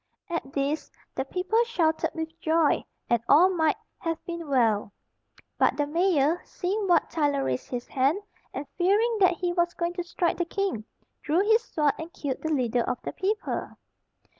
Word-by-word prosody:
At 295 -5 -3
this, 285 +2 -1 0.2
the 265 - -2
people 375 +10 +1
shouted 325 -8 +1
with 320 0 -5
joy, 320 -1 +2 0.2
and 235 -2 +2
all 340 +6 +7
might 320 -3 +2 0.2
have 330 -2 -2
been 340 -2 -5
well; 225 -7 +2 0.7
but - - +3
the 290 - +1
mayor, 330 0 +2
seeing 395 +3 -2
Wat 345 -3 +3
Tyler 290 -4 +1
raise 125 0 -2
his 245 -1 -4
hand, 275 +6 +2 0.3
and 280 - -5
fearing 425 +6 +3
that 370 -2 +5
he 350 0 -1
was 345 -1 +1
going 340 0 -1
to 355 0 -3
strike 345 0 -1
the 345 - +1
king, 370 - -2 0.4
drew 315 +5 +2
his 445 +3 +4
sword, 300 -2 +1
and 320 +1 -6
killed 275 -3 -4
the 315 - -2
leader 245 -4 +1
of 250 +1 -1
the - - -4
people. 415 +3 -2
330 Hz, 175 wpm, -27 LUFS, 280-360 Hz, 0.7 s, all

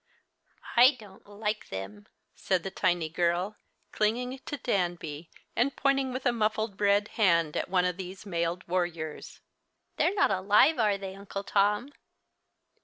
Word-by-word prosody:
"I 255 +3 +7
don't 200 -2 -15
like 210 +1 -4
them," 95 +2 -7 0.3
said 185 -3 -1
the 195 - -4
tiny 175 -4 +1
girl, 175 +5 0 0.4
clinging 250 +5 -1
to 290 - -3
Danby, 175 - -2 0.3
and 270 +3 +1
pointing 275 -1 +1
with 255 +1 -5
a 245 - +4
muffled 215 -2 -1
red 205 +1 +3
hand 170 -7 +2
at - - -2
one 180 -1 +2
of 180 -1 -1
these 190 +1 -8
mailed 170 -1 -2
warriors. 170 -3 -3 0.6
"They're 380 - +2
not 385 - +3
alive, 205 +11 +4
are 210 -3 +3
they, 195 -1 -6
Uncle 200 0 -6
Tom?" 210 +5 +1
195 Hz, 145 wpm, -29 LUFS, 175-220 Hz, 0.6 s, I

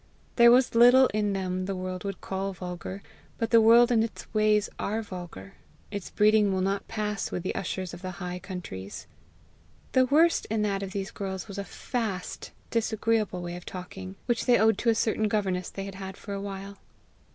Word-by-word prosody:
There 235 -1 +8
was 250 +1 +4
little 245 +3 +7
in 210 -1 +1
them 185 -1 -2
the 195 - -2
world 185 0 -4
would 195 -1 -4
call 195 +1 -3
vulgar; 180 +2 -6 0.3
but 230 -1 -2
the 230 -1 +7
world 235 +2 +7
and 225 -2 +4
its 225 - -6
ways 215 -1 +3
are 220 +2 -1
vulgar; 175 - -9 0.4
its 200 -3 -5
breeding 210 -1 +4
will 190 -1 0
not 195 +1 -1
pass 210 -2 -2
with 180 - -3
the 185 - -2
ushers 185 -2 -4
of 175 - -9
the 185 -1 -5
high 180 -1 -5
countries. 140 - -7 0.9
The 255 0 +4
worst 320 +5 +4
in 215 0 0
that 200 -2 0
of 195 -1 -5
these 195 0 -4
girls 190 -1 -5
was 200 -1 -6
a - - -2
FAST, 205 -3 -4 0.2
disagreeable 220 -4 0
way 175 0 -5
of 175 - -8
talking, 185 +1 -8
which 240 0 -1
they 245 - +6
owed 220 +2 +3
to 235 - +1
a 225 - +4
certain 220 -1 +1
governess 190 -4 -1
they 195 - -6
had 195 - -7
had 190 0 -7
for 200 - -7
a 200 - -3
while. 200 0 -7
200 Hz, 195 wpm, -27 LUFS, 185-220 Hz, 0.9 s, There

